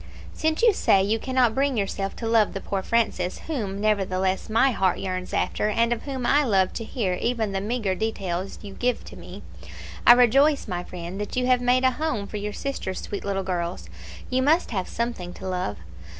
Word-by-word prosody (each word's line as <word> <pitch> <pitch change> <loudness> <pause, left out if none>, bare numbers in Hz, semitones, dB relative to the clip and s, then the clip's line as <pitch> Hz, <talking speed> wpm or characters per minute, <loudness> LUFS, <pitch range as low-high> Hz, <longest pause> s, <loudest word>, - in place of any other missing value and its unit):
"Since 315 +5 -1
you 460 -3 +6
say 195 - +3
that - - -1
you 225 - +2
cannot 255 -2 +2
bring 270 0 +1
yourself 195 -1 -2
to 230 - -5
love 225 -2 +3
the 195 - -3
poor 195 0 -3
Francis, 190 -5 0
whom, 210 -11 -3
nevertheless, 190 -3 0
my 230 +5 +4
heart 190 -5 +1
yearns 185 -1 -4
after, 210 - 0
and 230 +2 +2
of 230 - -5
whom 265 -3 -4
I 290 +4 +4
love 195 -7 +2
to 230 - -4
hear 220 -5 -2
even 230 -4 0
the 195 0 -2
meagre 215 -2 -1
details 195 -3 -3
you 200 -1 -8
give 250 +3 -1
to - - -11
me, - - -10 0.6
I 240 - +12
rejoice, 270 +5 +4
my 180 -3 -3
friend, 180 +3 -7
that 205 - -5
you 250 0 +1
have 250 -1 +3
made 250 +1 +3
a 260 - +5
home 275 -6 -2
for 210 - -6
your 210 0 -3
sister's 205 -6 -4
sweet 200 - -5
little 195 -1 -2
girls. 170 - -3 0.4
You 255 +1 +1
must 310 +4 +2
have 190 -5 -2
something 235 -7 -4
to 190 - -7
love. 180 - -2
215 Hz, 210 wpm, -25 LUFS, 190-250 Hz, 0.6 s, I